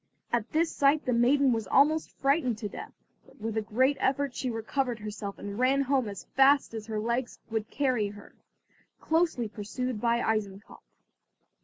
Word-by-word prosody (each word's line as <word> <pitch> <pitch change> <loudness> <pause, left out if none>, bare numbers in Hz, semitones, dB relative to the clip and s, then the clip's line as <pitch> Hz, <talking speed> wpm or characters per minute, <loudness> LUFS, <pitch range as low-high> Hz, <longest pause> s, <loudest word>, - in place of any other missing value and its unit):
At 235 -1 0
this 325 +1 +1
sight 285 +2 +3
the 250 - +1
maiden 260 +3 +4
was 225 -3 -2
almost 305 +7 +3
frightened 275 -4 +1
to 215 - -4
death, - - -8 0.3
but - - -21
with 220 0 -4
a 220 - +1
great 260 +6 +1
effort 275 0 0
she 255 - -3
recovered 240 +2 -2
herself 210 -2 -6
and 205 +2 -6
ran 265 +2 +3
home 265 -4 +1
as 200 -2 -7
fast 270 -1 +5
as 220 -1 -6
her 215 -1 -2
legs 235 +3 -2
would 220 -1 -2
carry 255 -7 0
her, 205 0 -12 0.7
closely 320 -8 +1
pursued 215 +2 -4
by 235 0 +2
Eisenkopf. 210 -3 -3
240 Hz, 170 wpm, -28 LUFS, 215-275 Hz, 0.7 s, fast